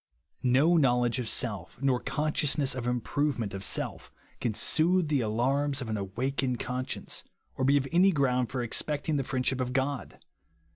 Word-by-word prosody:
No 135 +7 +4
knowledge 125 -4 +2
of 120 -3 -2
self, 105 -7 -3
nor 135 -2 +2
consciousness 150 +1 0
of 125 -2 -4
improvement 125 -2 -1
of 95 0 -5
self, - - -2 0.3
can 115 -4 -1
soothe 170 - +2
the 145 -4 +2
alarms 135 +6 +1
of 120 -5 -4
an - - 0
awakened 125 +6 -2
conscience, 130 0 -4 0.3
or 130 - -2
be 140 +2 +5
any 185 +3 +6
ground 130 -6 +1
for 125 -1 -2
expecting 150 +5 -1
the 135 - 0
friendship 130 0 -1
of 125 0 -2
God. 135 0 -2
130 Hz, 155 wpm, -29 LUFS, 120-145 Hz, 0.3 s, any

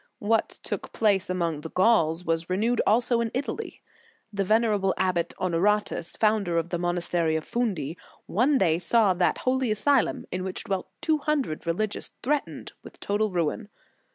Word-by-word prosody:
* - - -49
What 220 +2 +1
took - - -5
place 205 -3 +2
among 170 -4 -1
the 160 - -7
Gauls 180 -4 +2
was 165 +1 -1
renewed 220 +6 +1
also 235 +2 +3
in 230 - -1
Italy. 285 - -4 0.5
The 200 -1 0
venerable 210 -2 +2
abbot, 175 -2 0
Honoratus, 190 0 0
founder 210 -6 +1
of 165 +1 -1
the 175 - -2
monastery 175 -2 0
of 160 - -2
Fundi, 185 - -2 0.3
one 265 +8 +2
day 170 -7 +2
saw 210 0 +4
that 180 0 +1
holy 260 -1 0
asylum, 240 +5 +1
in 185 0 -3
which 190 0 -3
dwelt 190 -2 -3
two 310 -1 +1
hundred 280 - -2
religious, 205 +5 -2
threatened 290 +3 -2
with - - -14
total 210 +1 0
ruin. 180 +4 -2
195 Hz, 160 wpm, -26 LUFS, 175-225 Hz, 0.5 s, saw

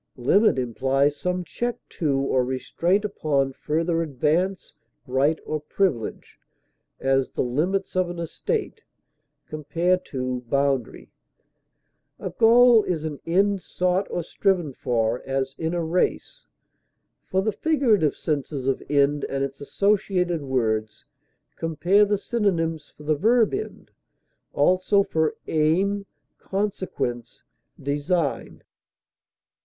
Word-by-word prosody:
Limit 190 - +3
implies 135 +4 +1
some 180 +3 -2
check 240 +7 -3
to 145 -5 0
or 130 -2 +1
restraint 170 +10 0
upon 140 -9 0
further 165 +4 -1
advance, 165 +6 -1 0.3
right, 135 +5 +2
or 155 - -2
privilege; 150 - -2 0.6
as, 135 0 +1
the - - 0
limits 175 +12 -1
of 185 -1 +1
an 175 - -6
estate 170 -2 -3 0.6
(compare 170 +4 0
BOUNDARY). 130 0 -1 1.1
A - - -5
goal 235 0 +6
is 170 -6 -2
an 150 -3 -4
end 195 +3 +2
sought 180 +2 0
or 175 - -2
striven 175 -4 0
for, 120 -2 -1
as 135 0 -2
in 165 +1 -1
a 170 - -1
race. 180 - -1 0.8
For 190 +1 0
the 220 - +1
figurative 235 - +2
senses 140 -3 -3
of 135 - 0
end 145 0 +2
and 135 0 -1
its 135 0 -5
associated 180 -1 +1
words, 110 -5 -1 0.5
compare 175 +6 +3
the 205 0 +1
synonyms 165 -9 -1
for 150 - -12
the 155 +1 +1
verb 225 +7 +3
END; 415 +2 -5 0.6
also 185 +2 +3
for 160 -5 0
AIM; 190 +6 +1 0.3
CONSEQUENCE; 185 - -3 0.4
DESIGN. 145 +3 -2
160 Hz, 115 wpm, -24 LUFS, 135-190 Hz, 1.1 s, goal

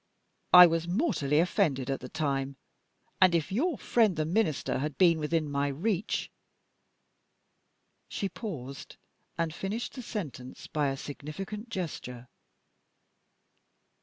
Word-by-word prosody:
I 180 0 +12
was 165 0 0
mortally 175 - +1
offended 155 - +1
at 135 - -2
the 125 - -9
time; 140 -3 -2 0.7
and 185 -2 +6
if 165 0 0
your 290 - 0
friend 220 -6 +2
the 155 -1 0
Minister 165 -6 0
had 150 +1 -3
been 170 -3 +5
within 155 0 0
my 140 0 0
reach 180 - -1 1.0
" - - -47
She 200 - -2
paused, 150 - -7 0.4
and 165 -1 -1
finished 200 +7 -4
the 255 - -7
sentence 150 - -6
by 150 -2 0
a 135 0 -2
significant 195 - -7
gesture. 125 - -5
165 Hz, 125 wpm, -29 LUFS, 140-195 Hz, 1.0 s, I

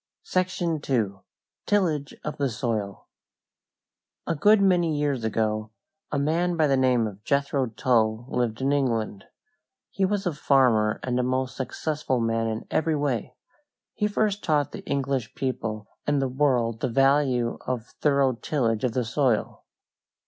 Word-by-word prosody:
SECTION 175 -4 -1
II. 105 -7 0 0.5
TILLAGE 165 -9 +1
OF 150 - -4
THE 140 -2 0
SOIL 110 -4 -3 1.2
A - - 0
good 205 +7 +5
many 175 -5 +3
years 140 -5 0
ago 110 -1 -1 0.4
a 145 - 0
man 165 +5 +1
by 155 - +4
the 140 -2 +3
name 130 -3 +3
of 105 -1 -7
Jethro 140 -1 +1
Tull 115 -1 +1
lived 120 -2 -1
in 135 +1 +1
England. 115 -8 -1 0.7
He 195 - -1
was 200 +1 0
a 175 - 0
farmer 125 -7 +3
and 125 -1 0
a - - +1
most 130 +1 -1
successful 140 0 -2
man 115 0 0
in 110 0 -3
every 160 0 +1
way. 130 -4 -2 0.6
He 210 - 0
first 210 -1 0
taught 150 -3 +1
the - - -8
English 135 -4 -2
people 110 -5 -3 0.2
and 145 -1 +2
the 135 - +1
world 125 -4 +1
the - - -1
value 135 -2 +2
of 125 -3 -2 0.2
thorough 140 -3 +3
tillage 115 -3 -1
of 125 -3 0
the 125 -1 0
soil. 125 -2 0
130 Hz, 150 wpm, -25 LUFS, 115-150 Hz, 1.2 s, good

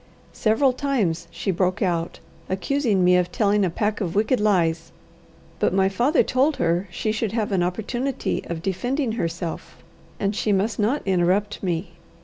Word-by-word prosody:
Several 235 +5 +2
times 220 - -1
she 195 - -2
broke 185 +3 0
out, 170 -3 -1 0.3
accusing 205 +1 +1
me 180 0 +5
of 180 0 0
telling 205 0 +2
a 185 - +2
pack 210 +5 -1
of 175 -3 -2
wicked 220 +5 +2
lies, 170 -6 +1 0.7
but - - +1
my 190 0 +3
father 245 - +2
told 275 +4 +2
her 170 +3 0
she 215 +5 -2
should 220 -1 -2
have 225 -1 -1
an 190 -2 +2
opportunity 240 +9 -2
of 165 -1 -5
defending 245 +7 -1
herself, 170 -6 -4 0.4
and 200 0 0
she 215 - 0
must 205 +4 0
not 235 +8 +1
interrupt 190 +2 +1
me. 175 -1 -2
200 Hz, 160 wpm, -23 LUFS, 180-225 Hz, 0.7 s, me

